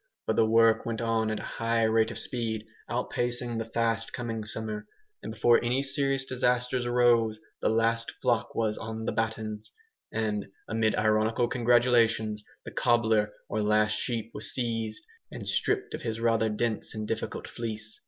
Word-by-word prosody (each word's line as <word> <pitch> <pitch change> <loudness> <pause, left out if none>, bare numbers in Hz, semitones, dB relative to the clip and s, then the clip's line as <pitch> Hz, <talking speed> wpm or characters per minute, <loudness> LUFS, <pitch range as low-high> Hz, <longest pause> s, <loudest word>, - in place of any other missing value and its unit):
But - - 0
the 110 - +4
work 115 0 +5
went 115 -1 -3
on 115 -1 +1
at 110 - -2
a - - -7
high 115 0 0
rate 110 0 +3
of - - -6
speed, 110 -3 -3 0.2
outpacing 120 -1 -1
the 115 - -2
fast 115 0 0
coming 115 -3 -3
summer; 110 -1 -5 0.3
and - - -6
before 115 +2 +4
any 125 +3 +1
serious 135 -1 +2
disasters 125 -1 0
arose, 120 -3 +3 0.2
the - - +2
last 115 +1 +1
flock 120 -4 0
was 110 -2 0
"on 110 0 -5
the - - 0
battens," 110 -1 -3 0.4
and, 105 -3 -2 0.2
amid 110 -1 +1
ironical 110 +2 +2
congratulations, 115 -3 +3 0.2
the - - -7
"cobbler," 110 -3 +2 0.2
or 110 - -1
last 105 0 +3
sheep 115 0 -2
was - - -4
seized, 115 -3 -2 0.3
and - - -7
stripped 410 0 0
of - - -4
his 115 -1 -3
rather 115 -1 +2
dense 110 +1 -2
and 110 0 -4
difficult 115 0 -3
fleece. 110 -2 -5
115 Hz, 165 wpm, -28 LUFS, 110-120 Hz, 0.4 s, work